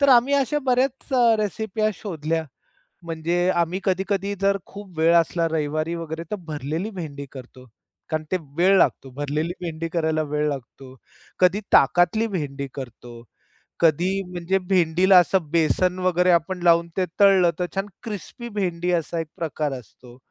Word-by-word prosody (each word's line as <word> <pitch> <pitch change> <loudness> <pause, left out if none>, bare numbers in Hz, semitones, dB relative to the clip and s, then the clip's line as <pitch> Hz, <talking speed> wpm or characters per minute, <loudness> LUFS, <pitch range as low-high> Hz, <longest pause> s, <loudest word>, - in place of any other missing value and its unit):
तर 280 - +4
आम्ही 260 +2 +5
अशा 280 +2 +1
बऱ्याच 260 +2 0 0.3
रेसिपी 215 0 -3
ह्या 215 0 +3
शोधल्या. 165 -4 -3 0.6
म्हणजे 170 +2 -1
आम्ही 175 +1 0
कधी-कधी 195 +1 -1
जर 200 0 +3
खूप 195 -4 -12
वेळ 165 +1 +4
असला 170 0 +2
रविवारी 155 +1 -1
वगैरे 165 0 -5
तर - - 0
भरलेली 155 +7 -3
भेंडी 155 -8 -7
करतो. 130 -1 -12 0.4
कारण 155 0 -1
ते 185 - +2 0.2
वेळ 185 +3 +5
लागतो 135 - +2
भरलेली 145 +5 -2
भेंडी 165 -1 -4
करायला 160 -2 0
वेळ 150 0 -1
लागतो. 130 -1 -8 0.4
कधी 185 +3 +4
ताकतली 175 +10 +4
भेंडी 140 -8 -4
करतो, 120 -2 -9 0.6
कधी 170 +2 +3 0.2
म्हणजे 175 +2 0
भेंडीला 185 +1 +4
असं 175 -3 +1
बेसन 180 +3 +2
वगैरे 180 0 +3
आपण 175 +2 +1
लावून 170 -1 +4
ते 185 - +2
तळल 195 -3 +6
तर 180 - +1
छान 195 +1 -1 0.2
क्रिस्पी 230 +2 -7
भेंडी 180 -4 -2
असा 170 0 -1
एक 165 - -3
प्रकार 150 -3 -2
असतो, 120 +2 -17
170 Hz, 150 wpm, -23 LUFS, 155-190 Hz, 0.6 s, तळल